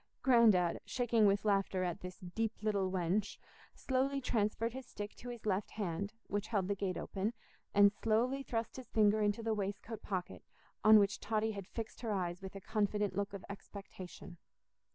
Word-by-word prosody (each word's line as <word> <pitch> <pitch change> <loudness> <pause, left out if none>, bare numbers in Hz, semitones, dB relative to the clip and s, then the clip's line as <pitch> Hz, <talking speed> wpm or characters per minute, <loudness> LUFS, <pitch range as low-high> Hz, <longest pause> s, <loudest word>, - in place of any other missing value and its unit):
Grandad, 220 -9 +5
shaking 235 -4 +2
with 200 +1 +2
laughter 195 -2 +2
at 175 -2 -2
this 180 0 -7 0.2
"deep 225 -1 -2
little 200 -3 +1
wench," 185 +3 0 0.4
slowly 270 +1 0
transferred 230 -2 0
his 260 -1 -7
stick 205 0 -6
to 245 - -9
his 240 -3 -8
left 195 -1 0
hand, 200 -1 -3
which 205 +1 -2
held 200 -5 0
the 200 - +1
gate 195 -3 -2
open, 200 +4 -2 0.4
and 200 0 +7
slowly 235 +6 +1
thrust 230 -3 -3
his 255 - -8
finger 215 0 +4
into 210 +2 +1
the 225 0 +1
waistcoat 205 +2 -4
pocket 185 -3 -4 0.4
on 215 +1 +9
which 205 0 +3
Totty 220 +1 0
had 200 -3 -6
fixed 225 0 -6
her 230 -3 -2
eyes 180 -2 -2
with 190 +1 -8
a 195 - -7
confident 210 -1 0
look 200 +1 -1
of 200 -2 -7
expectation. 190 -3 -9
205 Hz, 175 wpm, -35 LUFS, 195-225 Hz, 0.4 s, on